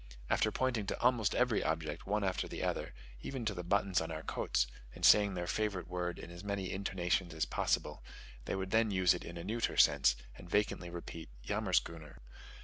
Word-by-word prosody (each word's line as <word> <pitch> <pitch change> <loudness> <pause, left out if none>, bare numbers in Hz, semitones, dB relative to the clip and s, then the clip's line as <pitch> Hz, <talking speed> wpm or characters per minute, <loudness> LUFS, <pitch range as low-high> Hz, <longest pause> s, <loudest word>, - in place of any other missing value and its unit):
After 110 - +3
pointing 120 -4 0
to - - -2
almost 120 -4 +2
every 125 -3 +2
object, 80 0 -2
one 105 +1 +1
after 95 -1 -1
the - - -5
other, - - -2 0.3
even 130 - -4
to 105 - 0
the 90 - -4
buttons 100 0 +2
on 80 - -4
our 80 -1 -5
coats, - - 0 0.3
and - - 0
saying 100 -2 +6
their 90 -1 -2
favourite 95 0 -1
word 90 -1 -3
in 85 - -9
as 85 +2 -9
many 100 -2 -2
intonations 90 -3 -1
as 80 - +1
possible, - - -1 0.4
they - - -2
would 95 0 -3
then 110 0 +4
use 95 -2 +4
it 90 - -5
in 85 - -8
a 85 - -6
neuter 115 +5 -1
sense, 65 -4 +5 0.2
and 90 - -12
vacantly 100 -3 0
repeat 85 -2 -7 0.2
"yammerschooner." 80 -3 -1
95 Hz, 195 wpm, -34 LUFS, 85-105 Hz, 0.4 s, saying